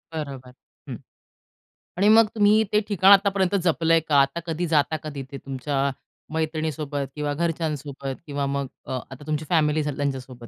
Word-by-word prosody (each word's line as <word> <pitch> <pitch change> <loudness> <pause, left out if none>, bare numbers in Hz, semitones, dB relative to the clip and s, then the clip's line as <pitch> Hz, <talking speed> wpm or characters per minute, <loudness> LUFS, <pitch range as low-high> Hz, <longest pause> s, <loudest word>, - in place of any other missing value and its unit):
बरोबर. 135 -5 -6 0.4
हं. - - -4 1.0
आणि 200 +3 +3
मग 220 0 +7
तुम्ही 210 +1 +4
ते 210 - +5
ठिकाण 195 -1 +4
आतापर्यंत 195 -1 +4
जपलंय 165 -1 +3
का? 155 -2 -2
आता 140 +4 0
कधी 170 +1 -2
जाता 150 +1 +2
कधी 145 -3 -6
ते 140 - -6
तुमच्या 135 +1 -2 0.4
मैत्रिणीसोबत 155 -3 -2
किंवा 150 -1 -2
घरच्यांसोबत 150 -4 -3
किंवा 140 -1 -2
मग 140 0 -2 0.2
अ, - - -8 0.2
आता 135 +2 -10
तुमची 155 0 -2
फॅमिली 155 -2 +2
त्यांच्या 140 -2 -2
सोबत, 125 -2 -12
150 Hz, 155 wpm, -24 LUFS, 140-170 Hz, 1.0 s, मग